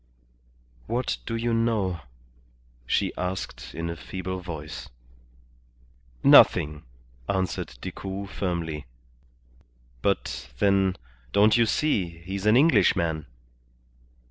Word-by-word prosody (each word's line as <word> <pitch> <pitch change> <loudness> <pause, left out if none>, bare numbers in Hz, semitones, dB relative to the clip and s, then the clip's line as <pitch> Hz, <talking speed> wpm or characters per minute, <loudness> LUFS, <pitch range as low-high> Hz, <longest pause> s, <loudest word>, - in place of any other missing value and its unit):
"What 120 +3 -1
do 115 - -2
you 115 +1 0
know?" 110 -6 +1 0.9
she - - +1
asked 90 -9 -4
in 85 0 -3
a 85 - -3
feeble 95 +2 -5
voice. 80 -4 -7 1.3
"Nothing," 75 0 +6 0.5
answered 95 -9 -2
Decoud, 100 +1 -6
firmly. 85 -6 -3 1.1
"But, - - -1
then, 95 +2 +3 0.4
don't 105 +2 +5
you 115 -1 +4
see, 95 - 0
he's 95 +2 -3
an 110 +3 +6
Englishman?" 85 - +3
95 Hz, 90 wpm, -26 LUFS, 85-105 Hz, 1.3 s, Nothing